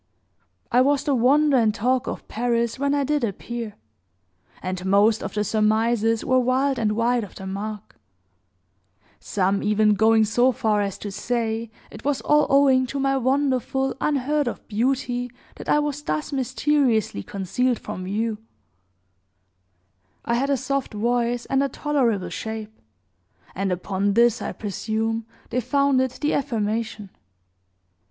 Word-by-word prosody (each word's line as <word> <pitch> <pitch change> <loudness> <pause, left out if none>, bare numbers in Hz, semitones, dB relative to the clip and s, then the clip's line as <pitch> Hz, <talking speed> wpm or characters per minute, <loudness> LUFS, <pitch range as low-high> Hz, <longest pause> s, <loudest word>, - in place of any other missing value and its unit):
"I 250 +1 +5
was 280 +1 +2
the 285 - +1
wonder 275 +3 +4
and 220 -3 +2
talk 250 +3 0
of - - -5
Paris, 235 +1 -1
when 280 +1 +1
I 285 - +1
did 295 0 0
appear; 230 +1 -4 0.8
and 185 0 -4
most 205 +3 +3
of - - -6
the 210 - +1
surmises 220 +1 +1
were 255 0 +3
wild 260 +1 +1
and 215 -2 +1
wide 235 +2 +1
of 200 - -10
the 190 - -8
mark 200 - -6 1.2
some 195 0 0
even 210 0 +3
going 220 +1 +4
so 240 +4 +3
far 220 -4 +1
as 200 -2 -3
to 205 - -6
say 225 +2 -2 0.2
it 215 - -11
was 285 -1 0
all 295 0 +3
owing 270 -2 +4
to 275 - -4
my 270 0 +1
wonderful 265 0 0
unheard 290 0 +1
of 240 - -5
beauty 245 +2 -1 0.3
that - - -8
I - - +4
was 295 -1 -1
thus 155 - -3
mysteriously 260 - +1
concealed 215 - -1
from 195 -4 -7
view. 215 +3 -2 1.9
I 235 - 0
had 265 +4 +1
a 280 - +2
soft 265 -2 -2
voice, 240 +2 0
and 270 0 +1
a 275 - +1
tolerable 250 -9 0
shape; 220 -1 -6 0.8
and 195 0 -2
upon 195 +2 -1
this, 235 +2 +3
I - - -3
presume, 220 +2 -3 0.2
they 250 +1 0
founded 260 +1 +2
the 295 +4 -2
affirmation. 220 -5 -2
235 Hz, 145 wpm, -23 LUFS, 215-265 Hz, 1.9 s, I